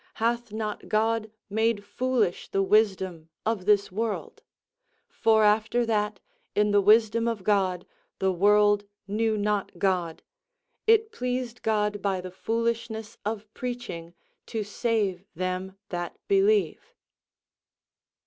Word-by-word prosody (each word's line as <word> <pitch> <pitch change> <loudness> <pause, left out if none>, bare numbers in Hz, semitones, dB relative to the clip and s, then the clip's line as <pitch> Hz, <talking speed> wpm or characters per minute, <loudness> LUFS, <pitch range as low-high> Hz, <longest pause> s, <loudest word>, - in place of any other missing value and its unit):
Hath 235 0 -1
not 215 -1 -4
God 220 +1 +1 0.2
made 220 0 0
foolish 240 -6 0
the 195 - +1
wisdom 190 -5 +1 0.2
of 220 -5 -1
this 205 -2 +3
world? 220 +2 -3 0.7
For 220 -1 +3
after 220 +3 +3
that, 210 -2 0 0.4
in 210 0 +3
the 205 0 +5
wisdom 225 +3 +4
of 225 -5 -2
God, 185 -3 +1 0.3
the 190 0 +1
world 205 +2 +4 0.2
knew 220 +2 0
not 205 -1 -1
God, 180 -4 0 0.6
it 445 0 +4
pleased 250 - -3
God 210 -2 0
by 195 -2 0
the 180 0 -7
foolishness 225 +1 -2
of 215 0 -3
preaching 240 -9 -6 0.3
to 220 -1 -2
save 205 -3 -1
them 185 +2 -3
that 175 -1 -4
believe." 405 +1 +2
210 Hz, 120 wpm, -27 LUFS, 195-230 Hz, 0.7 s, the